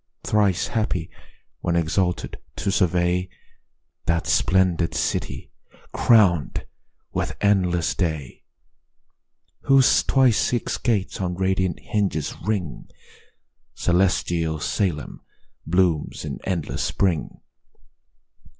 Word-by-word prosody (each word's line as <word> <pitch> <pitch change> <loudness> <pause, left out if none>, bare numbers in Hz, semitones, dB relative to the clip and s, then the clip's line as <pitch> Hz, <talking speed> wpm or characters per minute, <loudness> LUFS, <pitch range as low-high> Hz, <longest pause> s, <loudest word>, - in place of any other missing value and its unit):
Thrice 100 -4 +1
happy, 100 -7 -2 0.5
when 85 - -1
exalted 90 +2 -1 0.2
to 100 - -1
survey 90 0 +1 0.8
That 85 0 +1
splendid 85 -3 +2
city, 80 - -2 0.4
crown'd 95 -10 +3 0.5
with - - -2
endless 90 -5 +2
day, 80 -8 -3 1.2
Whose 135 -2 +5
twice 130 -5 +3
six 120 - -1
gates 105 -5 -1
on 90 -1 -2
radiant 95 -1 0
hinges 95 -8 -1
ring: 90 - -3 0.9
Celestial 85 -3 +1
Salem 85 -1 -2 0.5
blooms 85 -3 +1
in - - -5
endless 90 -5 -2
spring. 90 -6 -1
90 Hz, 85 wpm, -23 LUFS, 85-100 Hz, 1.2 s, Whose